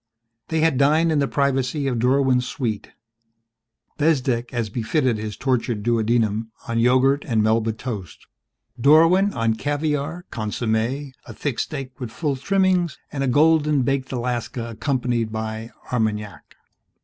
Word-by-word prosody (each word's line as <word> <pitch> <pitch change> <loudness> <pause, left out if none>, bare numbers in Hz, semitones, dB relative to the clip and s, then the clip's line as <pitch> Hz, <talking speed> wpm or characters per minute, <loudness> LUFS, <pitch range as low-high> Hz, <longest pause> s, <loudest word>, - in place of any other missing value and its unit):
They 160 -1 0
had 160 -5 +2
dined 155 +4 +4
in 155 - +2
the 140 - +1
privacy 140 0 0
of 125 -4 0
Dorwin's 130 0 +2
suite 115 -5 -3 1.1
Bezdek 130 -6 +1
as 115 -5 -2
befitted 120 +1 0
his 105 -1 -5
tortured 120 -4 -1
duodenum 115 -1 +1 0.2
on 115 -1 0
yogurt 130 +4 +3
and 110 -3 +2
Melba 110 +1 +2
toast 110 - -7 0.5
Dorwin 165 +9 +5
on 115 -1 +1
caviar, 145 +6 -2
consommé, 115 +5 -2 0.2
a - - -9
thick 140 -5 -3
steak 135 -4 -5
with 125 -3 -5
full 145 +4 -2
trimmings, 185 +3 +1
and 140 -2 -2
a - - 0
golden 150 +1 +3
baked 135 0 -1
Alaska 120 -1 -3
accompanied 120 -2 -1
by 110 +1 -4 0.2
Armagnac. 105 -3 -2
125 Hz, 135 wpm, -22 LUFS, 115-145 Hz, 1.1 s, Dorwin